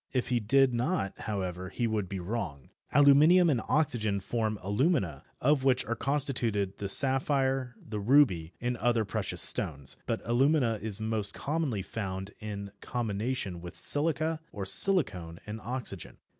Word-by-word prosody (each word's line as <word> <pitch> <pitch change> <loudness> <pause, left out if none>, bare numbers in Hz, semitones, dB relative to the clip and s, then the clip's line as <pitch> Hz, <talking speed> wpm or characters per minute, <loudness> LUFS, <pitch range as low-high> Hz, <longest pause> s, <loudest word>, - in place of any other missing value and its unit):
If 125 -1 -1
he 125 -1 +1
did 130 +4 +2
not, 120 - -2
however, 95 -4 -5
he 120 +5 -3
would 105 -5 -2
be 95 - -5
wrong. 90 - -6 0.2
Aluminium 150 +5 +5
and 125 -5 0
oxygen 115 -9 0
form 110 +1 -3
alumina, 100 - 0 0.2
of 140 0 +1
which 130 -2 +2
are 115 - -3
constituted 120 -8 -1
the 100 - -4
sapphire, 135 0 +4
the 105 -1 -7
ruby 100 - +3
and 125 0 -3
other 115 -1 0
precious - - -2
stones, 70 -1 0
but - - -1
alumina 125 -2 +1
is 105 -1 -3
most 110 -2 -1
commonly 145 -9 -2
found 95 -1 -6
in 100 -2 -7
combination 110 -5 -4
with 90 +1 -10
silica, 155 +1 0
or 100 -2 -6
silicon 95 - +5
and 105 +1 -7
oxygen. 120 -7 -5
115 Hz, 145 wpm, -29 LUFS, 100-135 Hz, 0.2 s, Aluminium